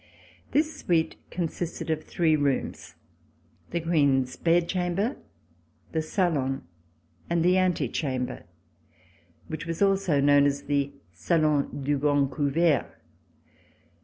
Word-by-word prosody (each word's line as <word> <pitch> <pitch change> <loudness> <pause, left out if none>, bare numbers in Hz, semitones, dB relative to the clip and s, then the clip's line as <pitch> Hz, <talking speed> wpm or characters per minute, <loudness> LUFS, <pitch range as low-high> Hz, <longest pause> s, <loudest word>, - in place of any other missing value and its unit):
This 310 +1 +1
suite 160 -2 0
consisted 170 -1 -3
of 155 0 -1
three 160 -3 +1
rooms 145 -3 -2 0.4
— - - -36
the 170 - -1
Queen's 140 -6 +2
bed 170 0 +2
chamber, 185 +7 -1 0.8
the 160 - 0
salon 155 -6 0 0.7
and 170 0 +1
the 180 +1 +4
antechamber, 140 -7 -1 1.0
which 160 +1 -6
was 165 -1 -3
also 195 -6 +2
known 145 0 +5
as 140 0 -2
the 140 -1 0 0.2
Salo7i 145 - 0
du 145 +1 0
Grand 145 -1 +2
Convert. 150 +1 +1
155 Hz, 110 wpm, -27 LUFS, 140-175 Hz, 1.0 s, known